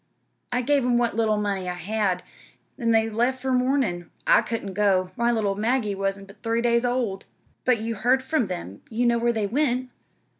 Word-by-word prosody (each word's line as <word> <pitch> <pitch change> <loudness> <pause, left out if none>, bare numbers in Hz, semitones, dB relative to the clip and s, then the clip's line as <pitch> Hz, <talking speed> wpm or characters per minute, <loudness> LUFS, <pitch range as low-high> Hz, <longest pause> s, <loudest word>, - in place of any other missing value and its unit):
I 250 0 0
give 285 +1 +2
'em 245 -1 +2
what 240 -3 +1
little 220 -1 +2
money 200 -3 -1
I 180 - -3
had, 190 -1 -1 0.5
an' 230 - -1
they 225 -1 +4
left 240 +4 0
'fore 265 -1 0
mornin'. 250 -9 +1 0.2
I - - +6
couldn't 215 -4 -4
go. 185 -2 +2
My 235 0 +2
little 215 -4 +1
Maggie 220 +1 0
wa'n't 195 0 -2
but 200 +1 -17
three 230 0 0
days 235 0 +3
old." 240 -6 -1 0.4
"But 250 -3 +3
you 230 +1 -2
heard 245 +5 +2
from 265 -5 0
them 140 - -6
you 235 +2 0
knew 235 0 +3
where 235 +1 +2
they 220 -3 -1
went?" 255 +2 0
230 Hz, 195 wpm, -25 LUFS, 200-245 Hz, 0.5 s, I